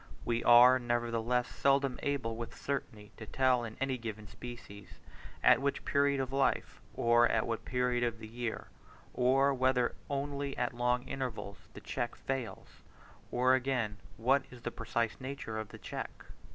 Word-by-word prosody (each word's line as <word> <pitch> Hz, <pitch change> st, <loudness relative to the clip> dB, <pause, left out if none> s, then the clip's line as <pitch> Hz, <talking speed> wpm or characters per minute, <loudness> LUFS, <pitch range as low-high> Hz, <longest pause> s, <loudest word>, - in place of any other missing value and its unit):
We 120 Hz, 0 st, 0 dB
are, 125 Hz, +2 st, +8 dB
nevertheless, 120 Hz, 0 st, 0 dB
seldom 135 Hz, -2 st, +1 dB
able 125 Hz, -6 st, -1 dB
with 115 Hz, 0 st, -7 dB
certainty 110 Hz, -7 st, -4 dB
to 110 Hz, -, -9 dB
tell 130 Hz, -1 st, +2 dB
in 110 Hz, -2 st, -7 dB
any 135 Hz, -1 st, -1 dB
given 110 Hz, -2 st, -6 dB
species, 105 Hz, -4 st, -10 dB, 0.4 s
at -, -, +6 dB
what 140 Hz, 0 st, -1 dB
period 140 Hz, 0 st, +2 dB
of 135 Hz, 0 st, -3 dB
life, 135 Hz, 0 st, 0 dB
or 120 Hz, 0 st, +4 dB
at 110 Hz, -, +1 dB
what 115 Hz, -1 st, -3 dB
period 125 Hz, -1 st, 0 dB
of 120 Hz, -1 st, -1 dB
the 110 Hz, -, -9 dB
year, 115 Hz, 0 st, -5 dB, 0.4 s
or 135 Hz, +3 st, +3 dB
whether 130 Hz, -1 st, +2 dB, 0.2 s
only 140 Hz, 0 st, -3 dB
at 125 Hz, 0 st, -1 dB
long 125 Hz, +1 st, +1 dB
intervals, 110 Hz, -9 st, -5 dB, 0.2 s
the -, -, -9 dB
check -, -, -3 dB
falls; 135 Hz, -4 st, -5 dB, 0.5 s
or, 125 Hz, +1 st, +3 dB
again, 125 Hz, -5 st, 0 dB, 0.2 s
what 130 Hz, +5 st, +3 dB
is 125 Hz, -1 st, -13 dB
the 120 Hz, -, -3 dB
precise 115 Hz, -2 st, -2 dB
nature 130 Hz, -4 st, -5 dB
of 110 Hz, -, -6 dB
the -, -, -10 dB
check. -, -, -5 dB
125 Hz, 160 wpm, -32 LUFS, 115-135 Hz, 0.5 s, are